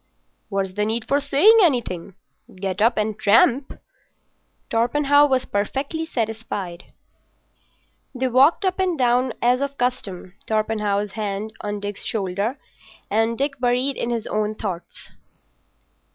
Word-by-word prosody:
"What's 195 -2 -2
the 210 +2 -1
need 220 +2 -1
for 280 - +2
saying 290 +11 +5
anything? 220 - 0 0.4
Get 190 +1 -3
up 230 +2 +3
and 215 0 -1
tramp." 235 +6 +3 0.9
Torpenhow 285 +5 +3
was 260 -1 +1
perfectly 275 +10 -2
satisfied. 220 - -4 1.3
They 260 +1 0
walked 270 - +4
up 375 0 0
and 365 -3 +1
down 250 -1 +2
as 250 +2 +3
of 280 0 -3
custom, 195 -8 -3
Torpenhow's 210 -2 0
hand 210 0 -4
on 205 0 -4
Dick's 205 -1 -5
shoulder, 200 +4 -2 0.5
and 225 +2 +1
Dick 275 0 -2
buried 250 +2 +1
in 235 - -2
his 235 -2 -2
own 215 0 -1
thoughts. 185 -5 -6
230 Hz, 125 wpm, -22 LUFS, 205-270 Hz, 1.3 s, saying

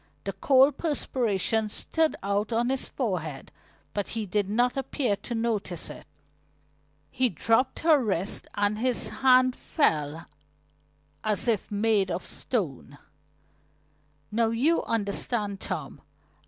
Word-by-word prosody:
The - - -3
cold 270 +1 +4
perspiration 225 - 0
stood 320 +8 0
out 200 +3 0
on 235 +2 +1
his 265 0 -1
forehead 175 - -3 0.4
but 205 -1 -2
he 225 -2 -3
did 200 +1 -1
not 245 +4 +2
appear 265 -4 0
to 235 +4 -5
notice 225 -2 -2
it. - - -12 1.0
He 255 -1 +2
dropped 225 - +1
her 315 -5 +5
wrist 195 -3 -1
and 205 +1 +1
his 250 0 0
hand 255 -1 +4
fell 160 - 0 1.0
as 215 +1 -1
if 220 -5 0
made 205 -2 +2
of 180 +1 -2
stone. 145 - -3 1.3
"Now 225 +1 +2
you 270 +9 +2
understand, 205 -1 -1
Tom. - - -5
225 Hz, 120 wpm, -27 LUFS, 200-255 Hz, 1.3 s, her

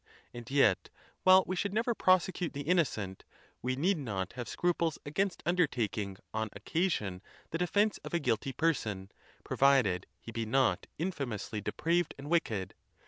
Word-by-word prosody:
And 120 -1 -8
yet, 135 -9 +3 0.3
while 185 0 +7
we 185 - -2
should 200 +2 -2
never 235 +2 +2
prosecute 185 -3 +2
the 140 - -4
innocent, 135 - 0 0.4
we 130 +1 -1
need 170 +6 +1
not 100 -9 -3
have 120 -1 -6
scruples 170 -2 0
against 190 +6 -1
undertaking 115 - 0 0.2
on 110 0 -1
occasion 105 - -1 0.3
the 165 - -2
defence 205 +4 +2
of - - -9
a - - +3
guilty 125 -2 0
person, 105 -12 -1 0.3
provided 125 -10 +3
he 115 - -9
be 115 -1 -3
not 130 +3 +2
infamously 135 - -3
depraved 170 - 0
and 145 +3 -8
wicked. 110 - 0
140 Hz, 145 wpm, -32 LUFS, 110-175 Hz, 0.4 s, while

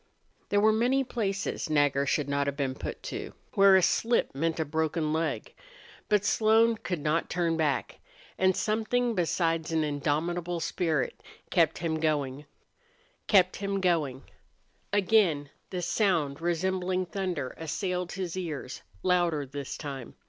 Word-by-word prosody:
There 205 - +3
were 215 +1 +5
many 250 +5 +2
places 200 -6 -2
Nagger 145 -2 +2
should 145 +1 +1
not 140 0 0
have 140 0 -2
been 135 -3 -1
put - - -7
to - - -5 0.2
where 195 -1 +7
a 190 - +5
slip 235 +6 +2
meant 165 +4 -1
a 160 - +1
broken 155 +1 -1
leg. 160 0 -2 0.6
But 210 -1 +3
Slone 225 +2 +4
could 180 -4 -3
not 155 +2 0
turn 170 -2 0
back. 150 -5 -1 0.4
And 185 0 +2
something 230 +3 0
besides 165 -3 0
an 160 -1 +2
indomitable 165 +4 -1
spirit 160 -4 -1 0.3
kept - - +3
him 160 -1 -2
going. 145 -3 -1 2.5
Again 190 -8 +2 0.2
the 180 -2 -4
sound 165 -6 +1
resembling 185 +2 0
thunder 175 -6 -3
assailed 180 +2 -3
his 185 -3 -4
ears, 160 -8 -5 0.2
louder 175 -5 +2
this 135 +1 -6
time. 135 -5 -7
170 Hz, 130 wpm, -28 LUFS, 150-190 Hz, 2.5 s, where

